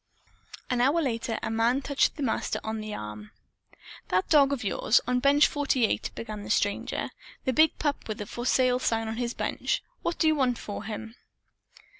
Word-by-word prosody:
An 245 -1 +2
hour 280 +7 +3
later, 230 -6 -1
a - - -2
man 235 +4 +2
touched 280 -1 +1
the 295 - -4
Master 240 - -1
on 220 0 -3
the 215 0 -6
arm. 105 - -7 0.8
"That 185 +1 +1
dog 285 -2 +5
of 265 -4 -2
yours, 210 +3 +3
on 250 0 +1
Bench 285 +3 +5
48," 270 -5 +1
began 215 -2 -6
the - - -9
stranger, 205 0 0 0.3
"the 260 - +1
big 315 +4 +4
pup 290 -2 -2
with 215 -1 -4
the 210 - -5
'For 240 - -6
Sale' 255 -1 +3
sign 225 -3 0
on 220 +1 -4
his 240 -1 -2
bench. - - -1 0.2
What 340 - -2
do - - +1
you 315 - +5
want 260 -5 +1
for 205 - -6
him?" 220 +1 -6
240 Hz, 190 wpm, -27 LUFS, 220-275 Hz, 0.8 s, dog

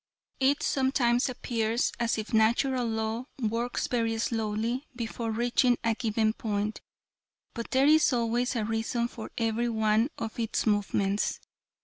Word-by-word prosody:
"It 275 +2 +2
sometimes 260 -2 +2
appears 230 -2 -1
as 235 -1 +1
if 215 +1 -5
Natural 240 +3 +3
Law 220 +2 -2
works 235 +1 -1
very 230 -2 0
slowly 225 +4 -1
before 230 -1 -4
reaching 240 +2 +2
a 230 -1 +2
given 220 -1 0
point, 210 -1 -2 0.7
but 235 -1 -5
there 265 +1 +3
is 310 +1 +5
always 240 +1 0
a 220 -3 0
reason 225 +2 -1
for 225 -2 -8
every 230 +1 0
one 220 +2 +2
of 225 0 -5
its 225 -1 -1
movements. 205 -1 0
230 Hz, 135 wpm, -28 LUFS, 220-245 Hz, 0.7 s, is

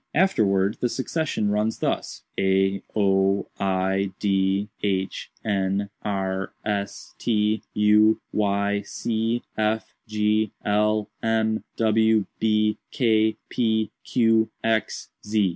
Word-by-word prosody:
Afterwards, 105 - +2
succession 135 -6 -1
runs 105 +2 0
thus: - - -2
a 95 0 +2
o 95 -1 +2
i 95 0 0
d 95 0 +1
h 95 -2 -2 0.2
n 100 -1 0
r 95 -2 -2
s 100 -2 -3
t 105 -2 +1
u 105 +1 +5
y 100 0 +1
c 115 +3 -2
f 110 0 -1
g 105 0 +1
l 105 0 +2
m 110 -1 +1
w 110 -1 +3
b 105 -1 +2
k 110 -4 +2
p 110 -3 0
q 115 -2 +3
x 110 -1 -1
z. 105 -2 +1
105 Hz, 105 wpm, -24 LUFS, 100-110 Hz, 0.2 s, u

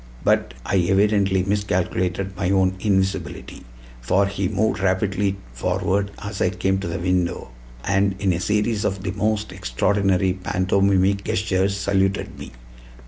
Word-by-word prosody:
But - - +1
I - - +1
evidently 95 +1 +2
miscalculated 95 -1 -1
my 90 -1 -1
own 95 -1 +3
invisibility; 95 -2 -2 0.4
for 95 +11 +2
he 100 -1 -2
moved 110 +4 0
rapidly 95 +1 0 0.2
forward 100 +10 0
as 105 -1 -5
I - - +3
came 95 +1 0
to 95 - -4
the 85 - -3
window, 90 -5 -1 0.3
and 100 0 +1
in 95 -2 +1
a 85 - -2
series 105 +4 0
of 95 0 -2
the 90 - -2
most 105 +1 -1
extraordinary 95 +7 +1
pantomimic 95 +1 +1
gestures 95 0 0
saluted 95 -1 0
me. - - -8
95 Hz, 140 wpm, -22 LUFS, 95-100 Hz, 0.4 s, own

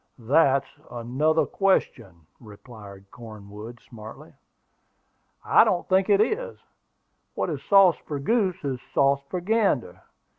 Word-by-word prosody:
"That's 135 +2 +2 0.2
another 130 +7 -1
question," 95 - -2
replied 100 -3 -14
Cornwood, 110 0 -11
smartly. 110 -3 -13 1.1
"I - - +5
don't 175 - -1
think 190 +1 +2
it 200 -1 +4
is: 470 - -1 0.8
what 175 - -2
is 145 -3 -5
sauce 195 -3 +5
for 145 - -4
goose 190 - -1
is 135 -3 -3 0.2
sauce 140 0 +2
for 180 - -3
gander. 175 - -1
140 Hz, 115 wpm, -24 LUFS, 110-185 Hz, 1.1 s, I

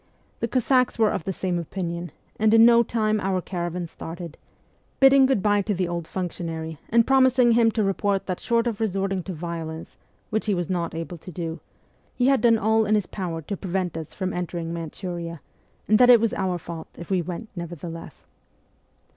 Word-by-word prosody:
The 230 - -1
Cossacks 255 +1 +2
were 220 -2 +3
of 205 -2 -3
the 195 - -1
same 180 -1 -2
opinion, 170 0 -4 0.3
and 220 +1 +4
in 225 0 +8
no 235 0 +7
time 215 -2 0
our 190 -1 0
caravan 175 -1 -4
started, 165 0 -8 0.6
bidding 270 0 +7
good 260 -8 +1
bye 205 -1 +3
to 205 0 -1
the 180 0 0
old 170 -1 -4
functionary 165 -4 -5
and 230 0 +4
promising 260 -2 +4
him 230 0 +5
to 220 -1 0
report 195 0 0
that 185 -2 -3
short 235 -1 +1
of 230 -4 -2
resorting 195 -3 -1
to 190 - -6
violence 165 -1 -6 0.3
which 220 +1 -1
he 205 - +2
was 175 0 -2
not 170 -3 -2
able 165 +1 -5
to 185 - -11
do 165 -1 -5 0.6
he 245 - +1
had 270 0 +4
done 230 -2 +5
all 220 +1 +2
in 215 - +3
his 205 -3 +1
power 170 -5 -5
to 200 - -4
prevent 185 -2 -3
us 160 -2 -6
from 185 -1 -3
entering 170 -1 -4
Manchuria, 170 0 -5 0.5
and 215 +2 +4
that 250 0 +7
it 240 -2 +9
was 230 -1 0
our 185 -2 -1
fault 165 -1 -8
if 170 - -9
we 185 -2 +2
went 180 +6 -6
nevertheless. 170 -1 -8
190 Hz, 195 wpm, -24 LUFS, 170-220 Hz, 0.6 s, it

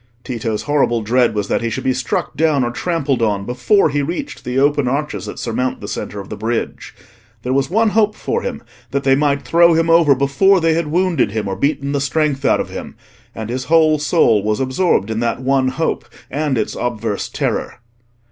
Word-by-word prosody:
Tito's 115 -3 -3
horrible 135 -6 +1
dread 120 0 +2
was 105 -1 -1
that - - 0
he 115 - -1
should 110 - -4
be 130 - +1
struck 125 -2 -2
down 155 -4 +2
or 120 - -1
trampled 145 -3 -1
on 100 -3 0
before 125 - +2
he 145 0 0
reached 180 - -5
the 125 +1 -3
open 145 -1 +2
arches 130 -7 -2
that - - -7
surmount 125 +2 -2
the - - -8
centre 105 - -5
of 100 - -9
the - - -5
bridge. 115 +1 -4 0.5
There 125 - -1
was 135 0 +1
one 220 +4 +2
hope 215 0 +2
for 465 - -2
him, - - -5 0.3
that 140 0 -2
they 135 - +4
might 140 0 +1
throw 170 0 +4
him 165 0 +2
over 165 -4 +5
before 140 +9 +3
they 165 -1 +2
had 165 -1 -1
wounded 165 - +1
him 110 -2 -2
or 95 - -2
beaten 140 +4 -1
the 140 -1 -1
strength 140 0 0
out - - +3
of - - -3
him; - - -7 0.4
and 110 0 -5
his 130 +1 -3
whole 155 -1 +4
soul 145 - +3
was 105 +1 -1
absorbed 130 - +1
in 110 - -2
that 115 0 -1
one 130 0 +1
hope 155 +5 -2 0.3
and 145 -2 -1
its 110 - -2
obverse 115 -4 -3
terror. - - -2
135 Hz, 210 wpm, -18 LUFS, 120-160 Hz, 0.5 s, over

